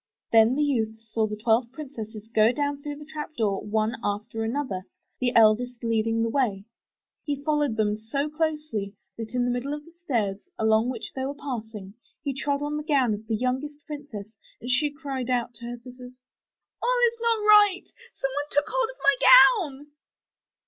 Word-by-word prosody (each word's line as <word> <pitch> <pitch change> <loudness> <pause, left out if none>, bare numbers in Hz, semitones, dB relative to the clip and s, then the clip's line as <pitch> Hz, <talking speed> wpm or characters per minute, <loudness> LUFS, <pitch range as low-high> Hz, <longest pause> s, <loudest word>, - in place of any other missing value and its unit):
Then 225 +2 +5
the 295 - +2
youth 225 -6 0
saw 220 0 -1
the 210 - -4
twelve 230 +2 +1
princesses 230 -7 -8
go 220 +1 +5
down 285 +2 -2
through 290 0 -5
the 295 +1 -11
trap 305 0 -7
door 205 -5 0
one 215 +2 -1
after 215 +2 -3
another, 230 -5 -2 0.4
the 250 -1 +1
eldest 230 +2 +4
lead 225 -1 +1
ing 225 0 +1
the 230 - 0
way. 210 -8 0 0.6
He 285 -2 -3
followed 295 -6 +1
them 210 -1 +1
so 225 +7 -3
closely 300 -10 -2 0.2
that 225 +1 -6
in 245 -1 +2
the 245 - +1
middle 255 +4 -2
of 295 0 -10
the 335 - -16
stairs 235 - -3
along 220 +2 +3
which 255 - -6
they 265 - -3
were 275 +2 -3
passing, 220 -8 -6 0.3
he 280 -2 -2
trod 280 +1 -1
on 295 +1 -2
the 300 - -4
gown 275 -7 +2
of 210 +1 -7
the 225 - 0
youngest 255 +5 -2
princess 290 -10 -7 0.3
and 245 +2 -4
she 295 +4 +2
cried 275 -4 -5
out 245 -1 0
to 235 +1 -10
her 240 0 -5
sisters, 250 +1 -12 0.6
*'A11 - - +3
is 465 0 -3
not 460 -1 +2
right, 415 -3 +6 0.3
some 270 - -2
one 290 +2 -2
took 290 +1 +2
hold - - 0
of - - -10
my 420 - +5
gown.' 360 - +6
255 Hz, 190 wpm, -26 LUFS, 220-295 Hz, 0.6 s, right